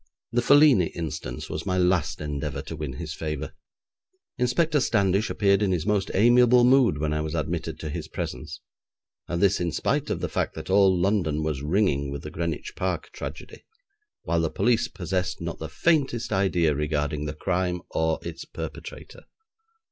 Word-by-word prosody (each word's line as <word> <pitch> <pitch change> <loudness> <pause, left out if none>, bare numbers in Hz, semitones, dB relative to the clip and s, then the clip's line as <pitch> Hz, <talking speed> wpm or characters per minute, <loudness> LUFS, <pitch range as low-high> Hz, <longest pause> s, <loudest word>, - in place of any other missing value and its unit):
The 120 - +2
Felini 140 - +6
instance 75 -7 -5
was 75 - -4
my 95 0 +1
last 90 -4 +1
endeavour 75 -2 -4
to - - -7
win 75 -4 -5
his 75 +2 -6
favour. 75 -2 -4 0.9
Inspector 150 +5 +2
Standish 100 -4 +2
appeared 100 -1 +2
in 100 -2 +2
his 85 -3 -1
most 105 -2 +1
amiable 120 +3 +6
mood 125 - +5
when 75 0 -1
I 75 - 0
was 80 +1 -3
admitted 80 -1 -3
to 80 - -4
his - - -5
presence, 70 +5 -6 0.7
and 85 - -2
this 100 0 +3
in 85 -1 -1
spite - - -1
of - - -1
the - - -2
fact - - -2
that - - -6
all 95 -2 +5
London 85 -5 +1
was 75 -3 -2
ringing 75 -3 +1
with 70 0 -6
the - - -7
Greenwich 85 -2 -4
Park 90 -3 -3
tragedy, - - -8 0.6
while 85 -1 +1
the 80 - 0
police 120 +6 +1
possessed 90 0 -3
not 85 0 -5
the 80 - -5
faintest 135 - +1
idea 90 -5 +2
regarding 75 0 -1
the 75 +1 -4
crime 90 +1 -1
or 80 0 +1
its - - -6
perpetrator. - - -9
85 Hz, 170 wpm, -25 LUFS, 75-100 Hz, 0.9 s, Felini